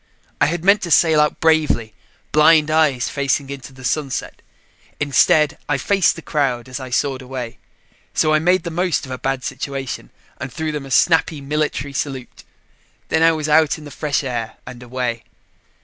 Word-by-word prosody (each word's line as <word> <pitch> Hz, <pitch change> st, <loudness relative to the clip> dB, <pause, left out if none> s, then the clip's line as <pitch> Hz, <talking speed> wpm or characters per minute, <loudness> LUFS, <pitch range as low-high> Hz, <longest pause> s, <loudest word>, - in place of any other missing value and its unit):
I -, -, +5 dB
had 170 Hz, +1 st, -3 dB
meant 200 Hz, +1 st, +5 dB
to 175 Hz, -, -4 dB
sail 160 Hz, -1 st, +5 dB
out 150 Hz, -, 0 dB
bravely, 155 Hz, -9 st, +2 dB, 0.4 s
blind 155 Hz, 0 st, +5 dB
eyes 150 Hz, -6 st, +2 dB
facing 140 Hz, 0 st, -1 dB
into 140 Hz, -1 st, -8 dB
the 130 Hz, 0 st, -14 dB
sunset; 135 Hz, 0 st, -3 dB, 0.6 s
instead, 150 Hz, +1 st, +3 dB
I -, -, +2 dB
faced 195 Hz, -3 st, +2 dB
the -, -, -10 dB
crowd 130 Hz, -5 st, -1 dB
as 130 Hz, +1 st, -6 dB
I 130 Hz, -1 st, -7 dB
soared 135 Hz, +1 st, -1 dB
away, 125 Hz, -2 st, -7 dB, 0.5 s
so 155 Hz, -, +2 dB
I 155 Hz, -, +4 dB
made 180 Hz, +2 st, +2 dB
the 170 Hz, -, -5 dB
most 175 Hz, -1 st, 0 dB
of 130 Hz, -, -10 dB
a 130 Hz, -, -5 dB
bad 135 Hz, -1 st, -2 dB
situation 135 Hz, -1 st, -5 dB, 0.3 s
and 130 Hz, -, -5 dB
threw 160 Hz, +5 st, -3 dB
them 145 Hz, -2 st, -5 dB
a -, -, -11 dB
snappy 160 Hz, +2 st, +3 dB
military 145 Hz, -1 st, -2 dB
salute. 135 Hz, -2 st, -5 dB, 0.7 s
Then 160 Hz, -, +1 dB
I 165 Hz, 0 st, +5 dB
was 155 Hz, -1 st, -3 dB
out 155 Hz, 0 st, +3 dB
in 155 Hz, -, -12 dB
the 145 Hz, -, -10 dB
fresh 145 Hz, +2 st, -1 dB
air 120 Hz, -4 st, -4 dB
and 125 Hz, -1 st, -10 dB
away. 120 Hz, -2 st, -3 dB
145 Hz, 180 wpm, -20 LUFS, 130-155 Hz, 0.7 s, I